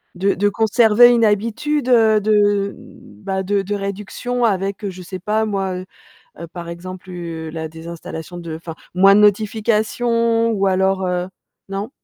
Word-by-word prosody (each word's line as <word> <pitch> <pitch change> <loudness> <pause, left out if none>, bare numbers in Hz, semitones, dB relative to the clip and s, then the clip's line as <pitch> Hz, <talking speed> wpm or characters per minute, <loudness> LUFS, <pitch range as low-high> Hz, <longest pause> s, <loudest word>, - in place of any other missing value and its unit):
de 195 +3 +1
de 205 +2 +1
conserver 225 +2 +5
une 235 -1 +3
habitude 230 +7 0
de, 210 -4 +3 0.5
bah, 190 0 -2
de 200 +1 0
de 205 +2 -3
réduction 205 +5 -4
avec, 200 -1 -1
je 185 -1 -9
sais 185 +1 -7
pas 215 +4 0
moi, 195 -3 -2
heu 185 +1 -6 0.6
heu, 170 - -6
par 170 +1 -9
exemple, 185 +2 -8
heu, 165 -2 -6
la 160 0 -5
désinstallation 165 +1 -8
de 170 -2 -6
enfin, 165 0 -8 0.2
moins 195 +2 +6
de - - +5
notifications 225 +2 +2
ou 200 -2 0
alors, 190 0 +1
heu, 180 0 -1 0.4
non? 195 +4 -4
200 Hz, 155 wpm, -19 LUFS, 180-220 Hz, 0.6 s, moins